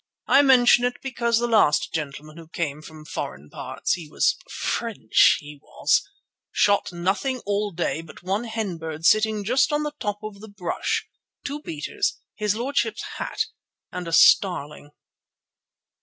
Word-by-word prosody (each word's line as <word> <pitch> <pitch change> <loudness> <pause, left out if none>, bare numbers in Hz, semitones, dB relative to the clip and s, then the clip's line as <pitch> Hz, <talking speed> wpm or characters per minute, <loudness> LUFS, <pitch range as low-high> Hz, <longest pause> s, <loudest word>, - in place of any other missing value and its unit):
I 280 - +6
mention 245 -3 +6
it 245 0 +1
because 235 -3 0
the 240 - +1
last 215 -10 +3
gentleman 155 0 -5
who 165 -1 -11
came 155 -3 -3
from 155 0 -12
foreign 75 - -6
parts—he 165 -4 -3
was - - +2
French, 220 - +2
he 145 -1 -11
was—shot 200 -1 0
nothing 190 +10 -1
all 205 +1 0
day 170 -3 -2
but 165 +1 -14
one 195 +6 -1
hen 220 -7 -3
bird 160 0 -6
sitting 215 0 +3
just 255 +8 +2
on 295 0 +1
the 300 0 -3
top 205 -2 -2
of 215 -2 -7
the 220 +1 -11
brush, 190 -4 -2 0.4
two 290 +1 -4
beaters, 150 - -3
his 210 -1 0
lordship's 255 +5 -1 0.2
hat, - - -2 0.5
and 180 -1 -5
a - - -4
starling." 150 -5 +4
200 Hz, 145 wpm, -24 LUFS, 160-235 Hz, 0.5 s, I